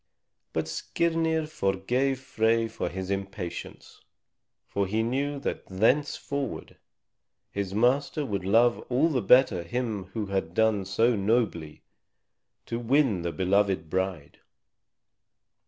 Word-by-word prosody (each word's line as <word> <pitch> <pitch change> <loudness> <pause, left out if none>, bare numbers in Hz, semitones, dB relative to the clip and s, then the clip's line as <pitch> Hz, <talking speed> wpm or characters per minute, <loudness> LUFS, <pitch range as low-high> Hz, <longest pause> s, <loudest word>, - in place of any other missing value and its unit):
But 80 0 -2
Skirnir 160 - 0
forgave 125 +1 0
Frey 115 -3 +1
for - - -4
his 95 +1 -5
impatience, 95 -3 -6 0.6
for 100 -1 -1
he 110 +3 0
knew 140 +5 -1
that - - -4
thenceforward 135 +6 -1 0.7
his 100 -1 -3
master 135 +6 +2
would 100 -6 -3
love 115 +5 +4
all 130 +6 +3
the 130 -6 0
better 120 -3 +5
him 105 +2 -3
who 110 -2 -1
had 95 -4 -3
done 110 -3 +2
so 115 +5 +2
nobly 100 -7 -1 0.8
to 115 - -3
win 120 - +2
the 85 0 -2
beloved 95 -1 +1
bride. 95 -6 -3
110 Hz, 115 wpm, -27 LUFS, 95-130 Hz, 0.8 s, better